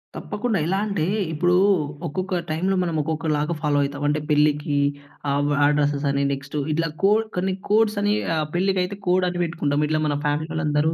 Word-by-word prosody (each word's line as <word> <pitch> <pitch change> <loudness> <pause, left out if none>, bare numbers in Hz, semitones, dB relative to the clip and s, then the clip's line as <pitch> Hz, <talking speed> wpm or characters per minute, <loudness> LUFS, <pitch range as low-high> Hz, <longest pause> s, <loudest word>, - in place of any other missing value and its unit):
తప్పకుండా! 210 +1 -2
ఎలాంటే, 195 -1 0 0.3
ఇప్పుడు 175 +3 +2 0.5
ఒక్కొక్క 185 +4 -2
టైమ్‌లో 185 +5 0
మనం 170 -2 -2
ఒక్కొక్కలాగా 155 0 -1
ఫాలో 150 -2 +1
అయితం. 140 +1 -4
అంటే, 150 +1 +1
పెళ్లికి 150 -1 +2 0.6
ఆబ్ 145 +1 +1
ఆ - - +6
డ్రెసే‌స్ 145 0 0
అని 140 0 0
నెక్స్ట్ 140 +2 -6 0.2
ఇట్లా 165 +1 0 0.2
కోడ్ 210 +3 +4
కొన్ని 190 +1 0 0.2
కోడ్స్ 215 0 +3
అని 205 0 +2 0.2
ఆహ్, 155 -1 0
పెళ్ళికి 190 +1 +2
అయితే 195 +2 -5
కోడ్ 185 +1 +3
అని 175 0 -4
పెట్టుకుంటాం. 150 -3 0
ఇట్లా 155 0 +1
మన 145 -1 0
ఫ్యామిలీ 150 +2 -1
వాళ్ళందరూ 155 0 +1
160 Hz, 170 wpm, -23 LUFS, 150-185 Hz, 0.6 s, ఆ